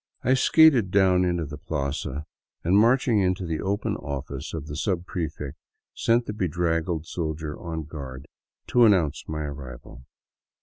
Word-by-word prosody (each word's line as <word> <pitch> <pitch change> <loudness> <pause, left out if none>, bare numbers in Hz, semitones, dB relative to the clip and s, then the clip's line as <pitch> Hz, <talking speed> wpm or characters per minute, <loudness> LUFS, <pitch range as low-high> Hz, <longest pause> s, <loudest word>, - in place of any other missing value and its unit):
I 130 - +3
skated 135 - +5
down 95 -1 +4
into 85 -2 0
the 75 0 -8
plaza 70 -1 -3 0.4
and, 90 +3 +3
marching 115 +1 +4
into 95 -1 +1
the 80 -2 -2
open 100 +2 -1
office 70 0 -5
of 80 -3 -5
the 75 - -7
subprefect, 80 -4 -3 0.4
sent 115 +1 +2
the 105 - -4
bedraggled 85 -3 -1
soldier 80 -2 -4
on 80 -2 -4
guard 70 -3 -8 0.4
to 120 -1 +6
announce 90 -9 +3
my 75 0 -3
arrival. 65 -3 -9
80 Hz, 140 wpm, -25 LUFS, 75-95 Hz, 0.4 s, to